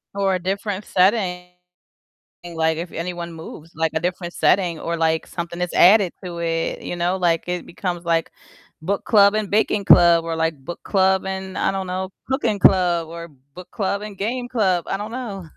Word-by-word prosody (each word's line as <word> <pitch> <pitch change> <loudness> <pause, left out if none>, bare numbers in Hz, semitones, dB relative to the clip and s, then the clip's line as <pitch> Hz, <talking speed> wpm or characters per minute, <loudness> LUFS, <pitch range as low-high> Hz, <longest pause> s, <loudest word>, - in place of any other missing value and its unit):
Or 195 -1 +1
a 185 - -2
different 195 +2 -3
setting, 185 -2 +1 1.0
like 160 -1 -1
if 170 0 -5
anyone 170 0 -5
moves, 160 0 -10
like 160 0 -1
a 160 - 0
different 175 0 -3
setting 175 -4 +2
or 170 +2 -3
like 160 -1 0
something 170 0 -6
is 180 - 0
added 195 -1 +5
to 175 -1 -6
it, 165 -1 -2
you 175 - -5
know? 175 +2 0
Like, 170 -3 +1
it 180 0 -3
becomes, 175 -1 -4
like 165 -1 0 0.5
book 200 +5 -2
club 200 -2 +5
and 215 -3 -1
baking 210 0 +1
club, 170 -3 +6
or 165 -1 -3
like 160 -1 0
book 175 - -7
club 190 -1 +2
and 190 0 -5
I - - +1
don't 190 -1 -4
know, 185 +1 -3 0.2
cooking 230 -7 0
club, 175 -4 +4
or 170 0 -8 0.3
book 180 0 -11
club 200 0 -2
and 210 -2 -8
game 245 +5 -3
club. 190 -8 +1
I - - -2
don't 210 +2 -6
know. 220 -7 -6
180 Hz, 190 wpm, -21 LUFS, 170-195 Hz, 1.0 s, club